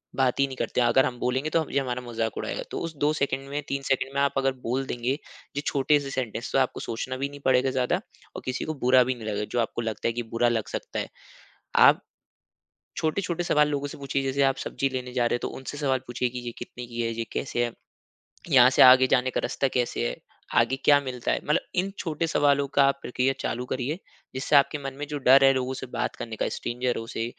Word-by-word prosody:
बात 130 -1 +1
ही 140 - +5
नहीं 135 - -7
करते 125 - -1
अगर 120 +2 +4
हम 125 -1 -3
बोलेंगे 130 +5 0
तो 165 - +2
हम 155 - -6
ये - - +2
हमारा 125 -2 -3
मज़ाक 115 -2 -3
उड़ाएगा। - - -3
तो - - -3
उस 165 -1 -7
2 145 +1 +3
सेकंड 140 -2 -2
में 145 +1 -2
3 140 0 -2
सेकंड 135 0 0
में - - +1
आप 140 -1 +2
अगर 135 0 +2
बोल 130 +4 -1
देंगे 125 +1 -1 0.4
जो 145 - -1
छोटे 145 +1 +3
से 140 -1 -6
सेंटेंस 125 -3 -3
तो - - +4
आपको 130 - 0
सोचना 130 +3 -4
भी 140 +1 -2
नहीं 145 0 -11
पड़ेगा 130 0 +4
ज़्यादा, 130 -1 +1 0.4
और - - -6
किसी 130 0 -2
को 155 - -2
बुरा 125 +1 +6
भी 130 +1 -1
नहीं 115 -3 -8
लगेगा 105 0 -2
जो 120 - 0
आपको 120 0 -1
लगता 110 -2 -2
है 115 - 0
कि 120 +1 -3
बुरा 120 +1 +3
लग 115 -2 -1
सकता - - -4
है। - - -3 0.7
आप - - +6 1.0
छोटे-छोटे 170 +2 -1
सवाल 150 -3 +3
लोगों 145 -1 -2
से - - -9
पूछिए 140 -1 -2
जैसे 135 +1 0
आप 135 -1 +3
सब्ज़ी 135 - -1
लेने 125 -1 -5
जा 125 -2 +1
रहे 120 - +1
हैं - - -3
तो - - -2
उनसे 135 +2 -7
सवाल 135 -3 +1
पूछिए 120 +1 -1
कि 125 +1 -6
ये 120 -1 -5
कितने 120 0 -8
की 120 0 -4
है, 115 0 -1
ये 115 0 -3
कैसे 120 -3 -1
है? 120 - -4 0.8
यहाँ 130 -3 +7
से 130 - +5
आगे 130 0 +9
जाने 130 0 +2
का - - -1
रास्ता 135 - 0
कैसे 120 -1 0
हैं? - - -5 0.4
आगे 135 - +1
क्या 145 -1 +7
मिलता 125 -3 -3
है? - - 0
मतलब 150 - +2 0.2
इन 185 +2 +1
छोटे 165 -1 -2
सवालों 145 -3 +2
का 140 - +6
आप 140 0 +2
प्रक्रिया 125 +2 0
चालू 125 +2 -2
करिए। 130 +6 -2 0.4
इससे 135 +3 +2
आपके 140 +2 +4
मन 135 -1 -4
में 145 - -4
जो 150 -1 -3
डर 135 0 +6
है 135 - +7
लोगों 130 0 -1
से 130 - -6
बात 125 - -3
करने 115 -1 -6
का - - -1
स्ट्रेंजरों 120 -1 -2
से 115 - -3
130 Hz, 245 wpm, -26 LUFS, 125-140 Hz, 1.0 s, आगे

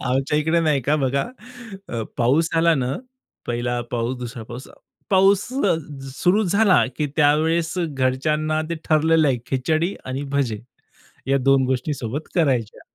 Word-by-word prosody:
आमच्या 135 +3 +1
इकडे 160 +2 +2
नाही 155 -4 +2
का 150 +5 +2
बघा, 135 -1 0 0.9
पाऊस 140 +7 +2
झाला 165 0 +4
ना, 130 -3 -1 0.5
पहिला 120 0 -1
पाऊस, 120 +2 -2
दुसरा 120 -1 -6
पाऊस. 120 +4 -9 0.4
पाऊस 195 +1 +5 0.7
सुरू 190 +4 +3
झाला 200 +1 +4
की 150 - 0
त्यावेळेस 160 +2 +2
घरच्यांना 150 +1 0
ते - - 0
ठरलेलं 160 0 +3
आहे 130 -2 +1
खिचडी 155 +8 0
आणि 130 +2 -4
भजे 130 -7 0 0.7
या 135 +1 +2
2 135 0 +3
गोष्टी 130 +3 -1
सोबत 135 +4 -5
करायच्या. 130 - 0
145 Hz, 135 wpm, -22 LUFS, 130-160 Hz, 0.9 s, पाऊस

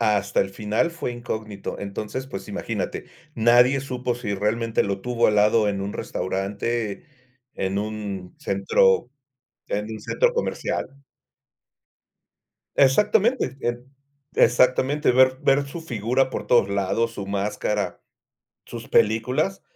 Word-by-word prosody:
Hasta 105 -3 +2
el 95 - -1
final 105 +10 0
fue 165 -7 -4
incógnito. 110 -4 -5
Entonces, 105 +6 -5
pues, 100 -7 -7
imagínate, - - -4 0.3
nadie 120 +4 +5
supo 125 -2 -3
si 115 -4 -3
realmente 110 +3 0
lo 100 -1 -2
tuvo 120 +2 +1
al 105 - +1
lado 105 +1 +4
en 100 -1 -2
un 100 +1 -3
restaurante, 100 +3 -3 0.5
en 95 +1 -1
un 105 -3 -5
centro 100 +3 +2 0.6
en 105 +1 -1
un 110 - -6
centro - - +1
comercial. 485 - -2 1.9
Exactamente, 205 - +3
et 120 0 -2 0.5
exactamente, 130 +4 +3
ver 130 +1 +4
ver 135 +1 +3
su 140 +5 -7
figura 125 -3 0
por - - -5
todos 120 -5 +4
lados, 100 +4 0
su 100 - -6
máscara, 100 +1 -2 0.7
sus - - -8
películas, 125 - +2
115 Hz, 120 wpm, -24 LUFS, 100-130 Hz, 1.9 s, nadie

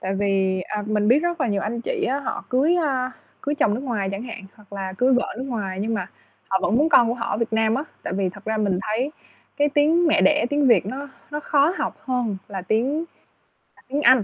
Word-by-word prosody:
Tại 190 +1 -2
vì, 190 -1 +1
à, 210 +3 -4
mình 210 -1 +1
biết 250 +5 +6
rất 345 0 -2
là 260 - +2
nhiều 200 -3 0
anh 230 +3 -2
chị - - -2
á, 275 +3 0
họ 280 - -4
cưới, 280 +7 +3
a, 265 -6 0 0.3
cưới 290 - -1
chồng 215 -7 +2
nước 235 - -3
ngoài 230 -8 -2
chẳng 195 +3 -4
hạn, 230 -5 -7
hoặc 205 -2 -21
là 195 -1 -4
cưới 260 +1 +4
vợ 250 - 0
nước - - -3
ngoài 205 -8 -3
nhưng 225 +2 -1
mà 200 -4 -2 0.4
họ 190 - +2
vẫn 200 +6 +2
muốn 300 +5 +4
con 245 -7 +6
của 235 - 0
họ 235 -1 -4
ở - - 0
Việt 230 -1 -2
Nam 220 0 +2
á. 275 +4 -1 0.2
Tại - - -4
vì 190 0 0
thật 195 +2 -11
ra 220 0 -1
mình 200 -4 +1
thấy 225 +6 -1 0.5
cái 290 0 +3
tiếng 305 +4 +3
mẹ 315 - +4
đẻ, 295 -5 +4
tiếng 290 -1 +2
Việt 235 - +4
nó 275 +6 -5 0.2
nó 295 0 -3
khó 295 +3 +2
học - - -2
hơn 245 -6 -1
là 195 -3 -5
tiếng 250 - 0 0.7
là - - -22
tiếng 280 +3 -1
Anh. 260 -5 +6
235 Hz, 255 wpm, -23 LUFS, 205-280 Hz, 0.7 s, biết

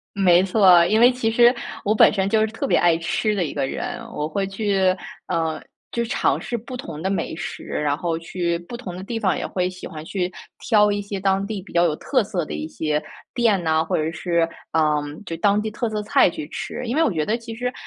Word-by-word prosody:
没 180 -2 +5
错， 185 -3 +6
因 215 +5 +2
为 245 +2 +7
其 240 -3 -1
实 240 +1 +6 0.3
我 210 - +2
本 - - +6
身 195 -1 0
就 220 - +3
是 215 - +4
特 220 - -4
别 175 - +3
爱 175 -1 +4
吃 215 +5 0
的 195 -3 0
一 150 - -4
个 140 -2 -1
人， 245 - -4
我 150 +1 -3
会 195 +5 -1
去 195 -2 +1 0.3
呃， 165 -2 -1 0.3
就 235 0 -1
尝 230 - +1
试 240 - -4
不 240 +3 -6
同 160 -9 -7
的 190 - -1
美 195 -4 -2
食， 185 - -6
然 145 -1 -1
后 165 -1 -2
去 170 0 -2
不 175 +8 -8
同 190 -8 -7
的 185 - -7
地 225 +3 -4
方 190 -4 +1
也 - - -3
会 180 -1 -1
喜 185 0 -7
欢 155 -1 -9
去 180 0 -2 0.3
挑 210 -2 +3
一 205 0 -1
些 200 -1 -5
当 195 0 +1
地 210 -4 -5
比 195 - -14
较 170 - +4
有 155 - +1
特 255 - +1
色 190 -5 -3
的 - - -7
一 - - -4
些 155 -1 -2 0.3
店 225 -6 +2
呐， 160 -1 +2
或 160 - -1
者 155 +1 -1
是， 170 -1 0 0.3
嗯， 150 -2 +1
就 165 - -4
当 200 +4 +3
地 215 0 -3
特 235 +2 -2
色 215 -1 -2
菜 205 - +4
去 155 -3 -6
吃。 - - -5
因 235 - -2
为 320 - +4
我 295 - +2
觉 155 -3 -1
得 220 - +1
其 230 -1 -7
实 250 +2 -3
190 Hz, 260 characters per minute, -22 LUFS, 165-220 Hz, 0.3 s, 为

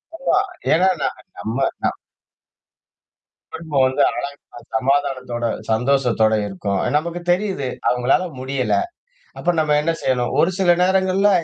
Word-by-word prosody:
ஆமா. 270 - +1 0.3
ஏன்னா 185 +4 +4
நான் - - -2 0.2
நம்ம 110 +2 -4 0.3
நான் - - 0 1.6
குடும்பம் 150 -5 0
வந்து 130 +2 +1
அழகா 140 -3 -6 0.2
சமாதானத்தோட 130 -3 0 0.2
சந்தோஷத்தோட 120 -2 +2
இருக்கும். 100 0 -2 0.2
நமக்கு 170 +3 -3
தெரியுது. 185 -7 -1 0.2
அவுங்களால 125 +8 +2 0.2
முடியல. 130 0 -1 0.6
அப்ப 175 - +1
நம்ம 150 -1 +2
என்ன 165 +2 +1
செய்யணும்? 125 -2 0
ஒரு 175 - +4
சில 175 -2 +4
நேரங்கள்ல 190 +2 +3
140 Hz, 115 wpm, -20 LUFS, 125-175 Hz, 1.6 s, ஏன்னா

